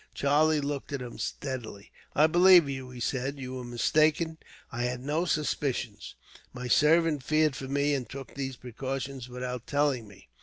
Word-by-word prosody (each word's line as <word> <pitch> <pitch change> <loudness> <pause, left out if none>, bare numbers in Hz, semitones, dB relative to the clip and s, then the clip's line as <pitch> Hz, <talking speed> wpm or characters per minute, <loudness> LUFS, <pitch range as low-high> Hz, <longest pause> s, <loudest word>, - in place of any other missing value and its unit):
Charlie 150 +2 +3
looked 140 0 -4
at 140 - -2
him 120 -2 -9
steadily. 115 -5 -5 0.2
"I 150 - +6
believe 175 0 +7
you," 130 -2 -5
he 125 -1 -10
said. 135 +3 -2
"You 130 -1 -6
were 130 -1 -5
mistaken. 155 +6 +1 0.3
I 120 -2 -2
had 125 0 -2
no 150 +6 0
suspicions. 135 -8 -2 0.4
My 125 0 -5
servant 155 +2 +4
feared 155 +1 +2
for 130 - -6
me, 145 +2 +1
and 130 -5 -2
took 135 -3 -8
these 135 -1 -4
precautions 130 +1 -5
without 125 -1 -5
telling 140 -6 +1
me. 95 -11 -17
135 Hz, 165 wpm, -28 LUFS, 125-150 Hz, 0.4 s, believe